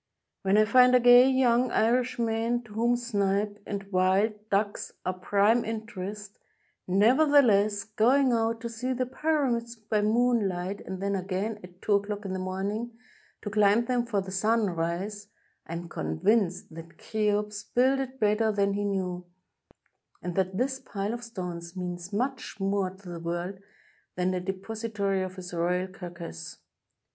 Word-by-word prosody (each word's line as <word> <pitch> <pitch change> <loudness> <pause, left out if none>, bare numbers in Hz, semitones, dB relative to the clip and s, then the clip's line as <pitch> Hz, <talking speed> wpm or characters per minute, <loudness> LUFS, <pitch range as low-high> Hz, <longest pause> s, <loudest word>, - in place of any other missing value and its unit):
When 195 0 +2
I 215 - +6
find 250 +2 +6
a - - +7
gay 245 +1 +7
young 255 -1 +3
Irishman, 235 0 +1
to 220 -3 -14
whom 235 +3 +2
snipe 205 -3 -1
and 200 -1 -3
wild 190 +4 +3 0.2
ducks 205 +1 -1
are 185 - 0
a 185 - -16
prime 205 +5 +3
interest, 210 -2 -6 0.5
nevertheless 215 -1 +4
going 245 +5 +3
out 225 0 0
to 235 - -3
see 240 +3 -3
the 255 0 -1
Pyramids 255 -4 -1
by 215 -1 -1
moonlight, 205 -4 +1
and 190 0 -5
then 200 0 0
again 195 +3 -3
at 180 0 -14
two 210 - +2
o'clock 205 +1 -1
in 190 - -3
the 185 - -3
morning 200 +5 -3 0.5
to 205 - -4
climb 210 +2 +4
them 245 -1 0
for 205 -4 0
the 190 0 -8
sunrise, 200 -1 -1 0.4
I 165 - -6
am 170 +1 -5
convinced 175 - 0
that 165 +1 -11
Cheops 210 -1 -1
builded 265 +1 +1
better 215 +1 +2
than 200 -1 +1
he 205 +1 -1
knew, 180 -3 -2 0.9
and 180 - -5
that 190 +1 -1
this 265 +2 0
pile 205 -1 -4
of 240 0 -6
stones 180 -6 -6
means 175 0 -5
much 245 +1 -3
more 195 -1 0
to 190 +1 -15
the 170 -1 -6
world 175 +3 -4 0.6
than 180 +1 0
the 180 -1 -2
depository 200 +1 -2
of 185 0 -4
his 180 -2 -8
royal 180 +2 0
car 185 -2 -8
cass. 170 - -8
205 Hz, 155 wpm, -28 LUFS, 185-230 Hz, 0.9 s, a